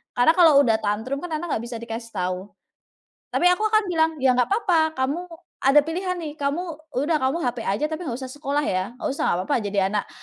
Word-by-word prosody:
karena 245 +6 +5
kalau 320 -5 +6
udah 225 -4 +2
tantrum 220 +6 -2
kan 330 -2 -4
anak 330 +1 -4
nggak 225 - -1
bisa 240 - -6
dikasih 230 0 -7
tahu. 180 +1 -2 0.8
Tapi 355 - +3
aku 360 +4 +2
akan 435 0 +4
bilang, 320 -2 +2
"Ya 260 -1 +3
nggak 250 +7 +1
papa, 340 -7 +2
kamu 280 +7 0 0.4
ada 275 +2 +5
pilihan 365 +2 -2
nih, 310 -3 -5
kamu 280 +4 0 0.4
udah 295 +5 +1
kamu 265 +5 +1
HP 245 0 -1
aja 215 +6 -1
tapi 315 +2 -5
nggak 245 -6 -4
usah 265 - -6
sekolah 290 +2 -2
ya, 190 +6 -2
nggak 315 - -3
usah - - -3
nggak 175 - +1
papa - - +1
jadi 200 -2 0
anak 205 - -1
275 Hz, 215 wpm, -23 LUFS, 230-325 Hz, 0.8 s, kalau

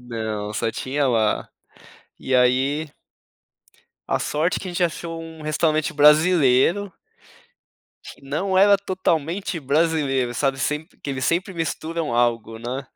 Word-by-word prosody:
Não, 110 -3 -4
só 115 - -1
tinha 135 +3 -1
lá. 110 -3 +1 0.7
E 130 - 0
aí 135 +5 +2 1.2
a - - +1
sorte 155 +4 0
é - - -6
que 190 - -7
a - - -5
gente 175 +1 0
achou 165 0 -3
um 160 -1 -10
restaurante 155 0 0
brasileiro 155 +4 +4 1.1
que - - -12
não 180 +8 -1
era 200 +1 +6
totalmente 185 -1 -2
brasileiro, 140 -4 +1
sabe? 135 +1 -1
Sempre 150 +5 -3
que 145 - -7
eles 130 -1 -3
sempre 185 +5 0
misturam 165 -3 -3
algo, 115 -2 0
né? 130 +3 -5
150 Hz, 135 wpm, -22 LUFS, 130-165 Hz, 1.2 s, era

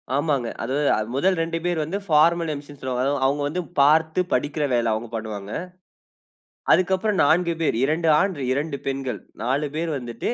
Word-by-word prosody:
ஆமாங்க. 140 -4 0 0.2
அது 125 +3 -3 0.4
முதல் 185 +7 +2
2 165 0 -1
பேர் 175 -3 0
வந்து 165 +6 -3
பார்மல் 165 +2 +4
எம்சின்னு 145 -1 -9
சொல்லுவாங்க. 130 -1 -1
அதாவது 140 0 0
அவுங்க 145 +2 +1
வந்து 175 +5 -2 0.2
பார்த்து 160 +4 +4
படிக்கிற 145 +3 0
வேல 120 -2 +2
அவுங்க 110 +2 -4
பண்ணுவாங்க. 105 -2 -5 1.2
அதுக்கு 185 +1 +3
அப்பறம் 200 -1 0
4 170 +3 +3
பேர், 155 - +1
2 160 +4 +1
ஆண், 190 +1 +1 0.2
2 145 +1 -2
பெண்கள். 135 -2 -3 0.2
4 140 +5 0
பேரு 165 +1 -1
வந்துட்டு 120 - -4
145 Hz, 165 wpm, -23 LUFS, 130-165 Hz, 1.2 s, பார்மல்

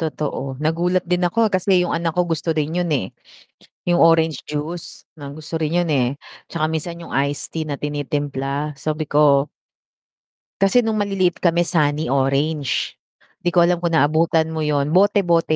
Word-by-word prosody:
Totoo 145 -4 -4
nagulat 170 +4 +1
din 180 0 +1
ako 220 +5 +2
kasi 185 -1 +2
yung 180 - -1
anak 165 -1 -1
ko 180 0 0
gusto 165 0 -1
rin 155 +2 -2
yun, 175 -1 0
eh, 100 -9 -2 0.7
yung 175 -1 +4
orange 165 -2 +3
juice 155 +3 -6
na 140 -2 -9
gusto 155 +2 -8
rin 160 +2 0
yun, - - -4
eh, 135 -2 0 0.3
tsaka 155 -2 0
minsan 165 +2 -4
yung 170 - -7
iced 140 +1 0
tea 160 - -1
na 145 -2 -5
tinitimpla, 145 0 -3
Sabi 155 +2 -3
ko 145 -1 +4 1.1
kasi 195 +5 +4
nung 220 -1 -1
maliliit 195 -3 0
kami 170 0 +2
sunny 155 -3 0
orange, 140 +1 0 0.4
di - - -5
ko 175 0 +4
alam 175 0 +2
kung 170 -1 0
naabutan 160 +1 +2
mo 160 - -4
yun 150 -1 0
bote-bote 180 -4 +3
160 Hz, 165 wpm, -20 LUFS, 145-175 Hz, 1.1 s, yung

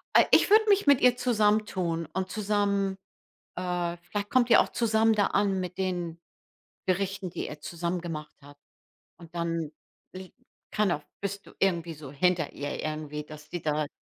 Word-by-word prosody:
Ah - - +7
ich - - +5
würde 435 +1 +7
mich 400 -3 +4
mit 280 -3 +5
ihr 250 0 +5
zusammentun 210 -8 +1
und 190 0 -2
zusammen 200 -2 0 0.6
äh, 175 -1 -2
vielleicht 205 0 -4
kommt 245 -2 +3
ihr - - +8
auch - - -2
zusammen 225 -1 +3
da 205 -2 +3
an 195 -1 +1
mit 180 +1 -5
den 175 -3 -2 0.7
Gerichten, 195 0 -1
die - - -5
ihr 150 - -8
zusammen 170 +3 -3
gemacht 155 -3 -6
habt. 145 0 -16 0.6
Und 170 -2 -14
dann 165 -2 -2 0.4
li 185 0 -9 0.4
keiner 195 -8 +1 0.2
bist 200 0 -4
du - - -14
irgendwie 170 -3 +1
so 145 -3 -10
hinter 170 +1 +1
ihr 145 0 -4
irgendwie, 155 -1 -4
dass 150 0 -12
die 175 -2 -5
da 150 -1 0
185 Hz, 165 wpm, -28 LUFS, 165-205 Hz, 0.7 s, ihr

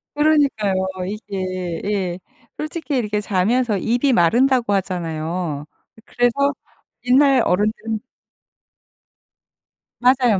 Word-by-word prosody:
그러니까요. 280 -11 +2 0.2
이게 185 -4 -4
예 190 -4 -2 0.4
솔직히 305 -1 -4
이렇게 210 -3 -1
자면서 210 +3 +1
입이 245 +7 +1
마른다고 235 +5 +3
하잖아요. 170 -4 -2 0.3
이 - - -16
그래서 260 +4 +1 0.5
옛날 270 +2 +5
어른들은 215 +3 0 2.0
맞아요, 245 -4 +3
210 Hz, 230 characters per minute, -20 LUFS, 185-255 Hz, 2.0 s, 옛날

